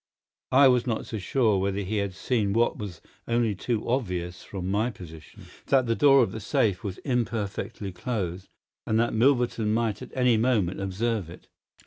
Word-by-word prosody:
I 135 Hz, +1 st, +7 dB
was 125 Hz, -1 st, +3 dB
not 115 Hz, -2 st, -1 dB
sure 110 Hz, 0 st, +1 dB
whether 100 Hz, +1 st, -1 dB
he 105 Hz, +3 st, -2 dB
had 100 Hz, -2 st, -2 dB
seen 100 Hz, 0 st, 0 dB
what 115 Hz, +2 st, +2 dB
was 100 Hz, -7 st, -7 dB, 0.3 s
only 115 Hz, -2 st, +1 dB
too 110 Hz, +3 st, -3 dB
obvious 90 Hz, -8 st, -2 dB
from 95 Hz, -2 st, -6 dB
my 110 Hz, +4 st, +1 dB
position, 80 Hz, -, -12 dB, 0.2 s
that 135 Hz, -2 st, +3 dB
the 115 Hz, -, +1 dB
door 140 Hz, -1 st, +6 dB
of -, -, -2 dB
the -, -, -6 dB
safe 105 Hz, -1 st, 0 dB
was 100 Hz, -3 st, -4 dB
imperfectly 110 Hz, -5 st, -2 dB
closed, 95 Hz, -3 st, -4 dB, 0.4 s
and 110 Hz, 0 st, +2 dB
that 115 Hz, -, +1 dB
Milverton 120 Hz, -2 st, +2 dB
might 110 Hz, -1 st, 0 dB
at -, -, -8 dB
any 125 Hz, -3 st, +3 dB
moment 110 Hz, -7 st, +1 dB
observe 100 Hz, -1 st, -2 dB
it. 85 Hz, -, -13 dB
110 Hz, 170 wpm, -26 LUFS, 95-120 Hz, 0.4 s, I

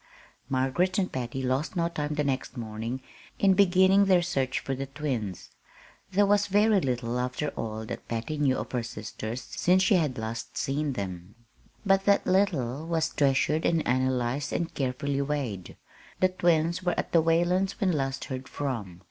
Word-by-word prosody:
Margaret 140 Hz, -, +1 dB
and 185 Hz, -2 st, 0 dB
Patty 130 Hz, +1 st, -4 dB
lost 130 Hz, +7 st, -1 dB
no 170 Hz, -1 st, +1 dB
time 150 Hz, -3 st, -3 dB
the 150 Hz, -, +1 dB
next 135 Hz, -1 st, -2 dB
morning 115 Hz, +3 st, -5 dB, 0.3 s
in 195 Hz, -1 st, +4 dB
beginning 190 Hz, +1 st, +5 dB
their 185 Hz, -3 st, +4 dB
search 135 Hz, -7 st, -1 dB
for 135 Hz, -, -3 dB
the 135 Hz, +1 st, -4 dB
twins. 130 Hz, -, -4 dB, 0.6 s
There 200 Hz, +2 st, +4 dB
was 205 Hz, 0 st, +3 dB
very 205 Hz, 0 st, +4 dB
little, 125 Hz, -3 st, -1 dB
after 125 Hz, +4 st, -2 dB
all, 110 Hz, -4 st, -5 dB
that -, -, -7 dB
Patty 115 Hz, +6 st, -3 dB
knew 135 Hz, -3 st, +2 dB
of -, -, -5 dB
her 125 Hz, -, 0 dB
sisters 110 Hz, +1 st, -6 dB
since 185 Hz, +2 st, +2 dB
she 195 Hz, -, +4 dB
had 155 Hz, -8 st, +1 dB
last 110 Hz, +1 st, -5 dB
seen 140 Hz, +1 st, -1 dB
them; 95 Hz, -2 st, -6 dB, 0.5 s
but 195 Hz, 0 st, +3 dB
that 200 Hz, -1 st, +4 dB
little 160 Hz, -7 st, +1 dB
was 165 Hz, -1 st, +1 dB
treasured 145 Hz, +2 st, +2 dB
and 165 Hz, -2 st, +1 dB
analyzed 130 Hz, +2 st, 0 dB
and 170 Hz, -1 st, -2 dB
carefully 140 Hz, +1 st, -1 dB
weighed. 135 Hz, -10 st, -3 dB, 0.4 s
The 185 Hz, -, +4 dB
twins 170 Hz, -1 st, +1 dB
were 180 Hz, -2 st, 0 dB
at -, -, -2 dB
the 165 Hz, -, +5 dB
Whalens' 175 Hz, +4 st, +1 dB
when 190 Hz, -2 st, +2 dB
last 135 Hz, -4 st, -2 dB
heard 130 Hz, -1 st, -6 dB
from. 110 Hz, -11 st, -4 dB
140 Hz, 170 wpm, -28 LUFS, 125-175 Hz, 0.6 s, beginning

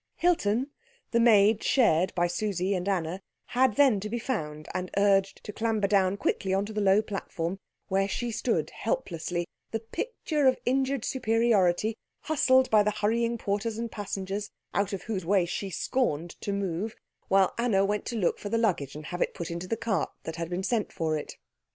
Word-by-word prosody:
Hilton, 270 Hz, -7 st, +1 dB, 0.4 s
the 235 Hz, -, +3 dB
maid 220 Hz, -2 st, +5 dB
shared 185 Hz, -, +3 dB
by 175 Hz, -1 st, +2 dB
Susie 185 Hz, +1 st, -1 dB
and 185 Hz, +1 st, -1 dB
Anna, 180 Hz, -1 st, -1 dB, 0.3 s
had 250 Hz, -3 st, +3 dB
then 265 Hz, -8 st, +5 dB
to 210 Hz, +2 st, -5 dB
be 235 Hz, -, -2 dB
found 155 Hz, -, -4 dB
and 180 Hz, 0 st, -3 dB
urged 195 Hz, -1 st, +2 dB
to 210 Hz, -, -7 dB
clamber 220 Hz, -2 st, 0 dB
down 195 Hz, -1 st, +2 dB
quickly 190 Hz, -1 st, 0 dB
on 195 Hz, +1 st, +1 dB
to 215 Hz, -, -7 dB
the 210 Hz, -, -1 dB
low 200 Hz, +2 st, +4 dB
platform, 190 Hz, -3 st, -4 dB, 0.3 s
where 195 Hz, +1 st, +1 dB
she 240 Hz, +4 st, -2 dB
stood 220 Hz, -, -1 dB
helplessly, 175 Hz, -, -2 dB, 0.2 s
the 225 Hz, -, -2 dB
picture 300 Hz, -, -1 dB
of 260 Hz, -, +4 dB
injured 265 Hz, 0 st, +1 dB
superiority, 225 Hz, -4 st, +2 dB, 0.2 s
hustled 260 Hz, -4 st, +3 dB
by 215 Hz, -1 st, +6 dB
the 210 Hz, -, +2 dB
hurrying 230 Hz, +3 st, 0 dB
porters 215 Hz, +1 st, -2 dB
and 230 Hz, -1 st, -4 dB
passengers, 200 Hz, 0 st, -4 dB, 0.2 s
out 200 Hz, -1 st, +1 dB
of 195 Hz, -2 st, -4 dB
whose 200 Hz, -5 st, -3 dB
way 185 Hz, +1 st, +3 dB
she 195 Hz, +3 st, -4 dB
scorned 175 Hz, -, -1 dB
to 200 Hz, -, -2 dB
move, 200 Hz, +1 st, -2 dB, 0.3 s
while 195 Hz, -1 st, +4 dB
Anna 210 Hz, -5 st, +3 dB
went 205 Hz, 0 st, -1 dB
to 235 Hz, -, -3 dB
look 195 Hz, -6 st, 0 dB
for 205 Hz, -, -5 dB
the 230 Hz, -, +1 dB
luggage 175 Hz, -, 0 dB
and 150 Hz, 0 st, -8 dB
have 175 Hz, +3 st, -5 dB
it -, -, 0 dB
put 170 Hz, 0 st, -5 dB
into 170 Hz, +2 st, -5 dB
the 225 Hz, -, -1 dB
cart 215 Hz, -7 st, -1 dB
that 160 Hz, -, -5 dB
had 170 Hz, 0 st, -3 dB
been 180 Hz, +2 st, -2 dB
sent 220 Hz, +1 st, 0 dB
for 160 Hz, -3 st, -1 dB
it. 150 Hz, -, -6 dB
205 Hz, 190 wpm, -28 LUFS, 185-230 Hz, 0.4 s, by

